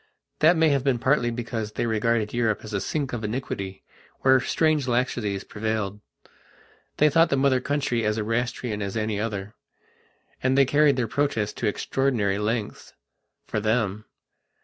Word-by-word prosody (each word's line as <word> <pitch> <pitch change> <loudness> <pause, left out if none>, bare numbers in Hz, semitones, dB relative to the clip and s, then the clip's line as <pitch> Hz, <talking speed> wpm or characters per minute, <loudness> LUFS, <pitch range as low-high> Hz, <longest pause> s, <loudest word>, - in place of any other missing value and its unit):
That 160 +3 +5
may 160 -1 +4
have 140 -3 +1
been 135 -3 +2
partly 130 0 +2
because 115 -2 -4
they - - -1
regarded 110 -1 0
Europe 115 -3 0
as 110 -1 -8
a 100 - 0
sink 140 +4 -2
of 115 -2 -3
iniquity, 105 -4 -4 0.4
where 130 0 +5
strange 155 0 +1
laxities 120 -5 -1
prevailed. 105 -2 -3 1.0
They 150 - +5
thought 165 +3 +4
the 140 - +1
Mother 135 -1 +3
Country 140 -4 -1
as 105 0 0
Erastian 115 0 -2
as 100 +2 -3
any 110 -1 -1
other. 105 -2 -4 0.9
And 130 +1 +2
they 140 - +6
carried 145 +2 +4
their 125 -3 0
protests 125 -4 -1
to 115 - -2
extraordinary 105 -3 0
lengths, 105 0 -3 0.5
for - - -2
them.... 110 -1 0
115 Hz, 155 wpm, -25 LUFS, 105-135 Hz, 1.0 s, they